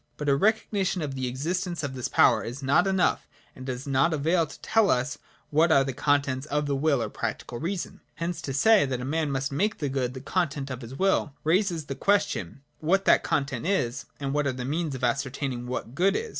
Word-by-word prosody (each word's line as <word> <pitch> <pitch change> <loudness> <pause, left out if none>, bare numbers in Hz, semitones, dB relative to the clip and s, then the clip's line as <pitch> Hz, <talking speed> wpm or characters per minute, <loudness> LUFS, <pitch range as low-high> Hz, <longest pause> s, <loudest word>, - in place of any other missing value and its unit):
But 150 -1 -2
a 140 - +5
recognition 195 -1 +1
of 140 -2 -3
the 130 -1 -2
existence 170 +6 -2
of 140 -2 -3
this 125 -2 -3
power - - +4
is 125 +4 -6
not 140 +8 +3
enough 190 -2 +1 0.3
and 130 0 -9
does 130 0 -4
not 140 +4 +2
avail 165 +3 +1
to - - -12
tell 220 -2 +3
us 130 +3 0 0.3
what 160 +3 +4
are 140 -3 +6
the 135 -1 -3
contents 140 0 0
of 150 0 0
the 140 -1 0
will 140 -3 +2
or - - -2
practical 120 - -4
reason. 180 +2 -4
Hence 170 +1 -3
to 135 - -4
say, 210 +10 +5
that 130 -2 -2
a 125 - -4
man 155 +2 0
must 135 0 -2
make 200 +9 0
the 145 - -2
Good 130 -1 -2
the - - -5
content 140 -3 -2
of 130 0 -5
his 120 +2 -8
will, 190 -5 +1
raises 170 -1 +1
the 135 - -4
question, 140 - 0 0.2
what 190 +5 +1
that - - +5
content 135 0 -1
is, 130 -12 0
and 140 -1 -2
what 145 -1 +1
are 130 - 0
the 125 -1 -5
means 155 +1 -2
of 130 - -8
ascertaining 130 -1 -1
what 125 -1 -4
good 185 +7 +2
is. 460 0 -2
145 Hz, 225 wpm, -27 LUFS, 130-170 Hz, 0.3 s, are